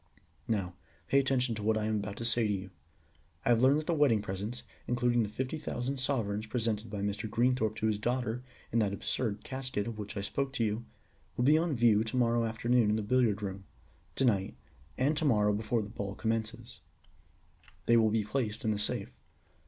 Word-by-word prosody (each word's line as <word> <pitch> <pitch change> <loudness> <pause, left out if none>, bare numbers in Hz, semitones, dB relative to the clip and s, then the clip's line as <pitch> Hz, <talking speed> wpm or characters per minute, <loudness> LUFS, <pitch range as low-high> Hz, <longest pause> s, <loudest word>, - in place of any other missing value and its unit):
Now 95 -5 -1 0.4
pay 140 - +5
attention 130 -3 +1
to 110 - -5
what 110 +1 +2
I 105 - -1
am 110 0 +1
about 100 0 -4
to 115 - -4
say 115 -1 +3
to - - 0
you. 95 -1 -5 0.7
I - - +2
have 120 -1 +5
learned 135 +3 +6
that - - -10
the 170 - +1
wedding 145 -8 +4
presents, 105 +5 -4 0.2
including 120 0 +2
the 105 - -1
fifty 130 +8 -3
thousand 135 -2 -3
sovereigns 110 -6 -1
presented 110 -1 -1
by 105 -2 -4
Mr. 105 +2 -2
Greenthorpe 120 -1 +1
to 110 - -2
his 110 -2 +1
daughter 120 +1 -1 0.3
in 115 - +2
that 100 -3 +1
absurd 105 0 -2
casket, 130 -6 -3
of 115 -2 -5
which 105 0 -6
I - - -1
spoke 135 +7 -2
to 120 - 0
you, 110 +2 -1 0.5
will 120 - +1
be 145 +4 +6
on 160 -2 +1
view 115 -3 +4
to 110 +3 -3
morrow 120 -1 +3
afternoon 115 0 +2
in 105 - +3
the 110 - -1
billiard 105 -2 +2
room; 95 -1 -5 0.5
to 135 - +2
night, 100 -5 +1 0.4
and 140 +4 +2
to 155 - +1
morrow 105 -6 +4
before 110 +2 0
the 100 - -8
ball 100 -2 -5
commences, 115 +1 -3 1.1
they 115 - +5
will 110 -1 +5
be 110 0 +1
placed 110 -1 -2
in 110 - +3
the 105 - -1
safe. 105 - -2
115 Hz, 205 wpm, -31 LUFS, 105-125 Hz, 1.1 s, learned